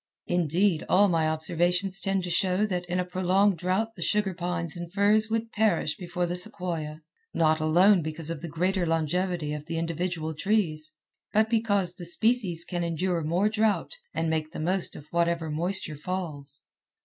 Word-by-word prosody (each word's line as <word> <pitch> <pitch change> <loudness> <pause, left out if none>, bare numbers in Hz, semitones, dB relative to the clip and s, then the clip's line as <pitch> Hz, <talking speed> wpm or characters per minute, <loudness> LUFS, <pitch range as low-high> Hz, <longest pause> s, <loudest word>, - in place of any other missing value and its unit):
Indeed, 175 +1 +1
all 205 +2 +5
my 165 -2 +2
observations 175 +4 +1
tend 195 -1 0
to 175 - -3
show 190 +3 +2
that 180 -3 -3
in 180 +1 -1
a 180 - 0
prolonged 185 +1 +2
drought 190 +6 0
the 175 - -10
sugar 205 +1 +1
pines 170 -2 -2
and 175 -1 -7
firs 210 +3 +3
would 225 0 -2
perish 205 -8 +1
before 180 -1 -3
the 175 +1 -3
sequoia, 175 -5 -2 0.3
not 155 -1 +3
alone 175 +5 +5
because 160 +1 -4
of 165 - -5
the 170 - -5
greater 180 +3 0
longevity 165 0 0
of 150 +1 -7
individual 165 0 -2
trees, 155 -4 0 0.4
but 220 +1 +3
because 205 -6 +1
the 180 -2 -8
species 190 -3 +3
can 175 -2 -3
endure 170 +1 -1
more 170 +6 +1
drought, 215 -1 +1 0.2
and 165 - -1
make 160 -1 -1
the - - -6
most 180 +4 -1
of 145 - -10
whatever 170 -2 0
moisture 170 +1 -1
falls. 150 -5 -3
175 Hz, 170 wpm, -27 LUFS, 160-195 Hz, 0.4 s, all